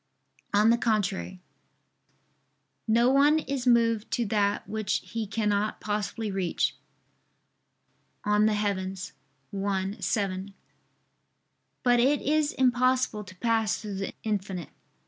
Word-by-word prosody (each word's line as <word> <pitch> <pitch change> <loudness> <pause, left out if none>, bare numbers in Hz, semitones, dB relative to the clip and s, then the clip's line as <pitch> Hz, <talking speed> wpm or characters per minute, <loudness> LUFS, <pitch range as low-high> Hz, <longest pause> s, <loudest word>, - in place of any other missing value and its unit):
On 210 +2 +5
the 235 - +2
contrary, 195 -5 -1 1.5
"No 235 +3 +4
one 285 +3 +5
is 275 -4 -3
moved 230 -2 +3
to 240 - +1
that 205 -1 0
which 215 -1 -1
he 220 +3 -4
cannot 210 0 0
possibly 210 +1 -3
reach" 190 -3 0 1.5
(De 210 - -1
Coelo 200 -3 0 0.6
i, 195 0 -1
7). 195 -1 -2 1.3
But 245 -1 +4
it 275 +4 +3
is 300 0 +1
impossible 255 -3 +2
to 185 -2 -13
pass 225 0 +1
through 210 -2 -6
the 195 - -4
infinite. 195 -5 -3
215 Hz, 105 wpm, -27 LUFS, 200-235 Hz, 1.5 s, On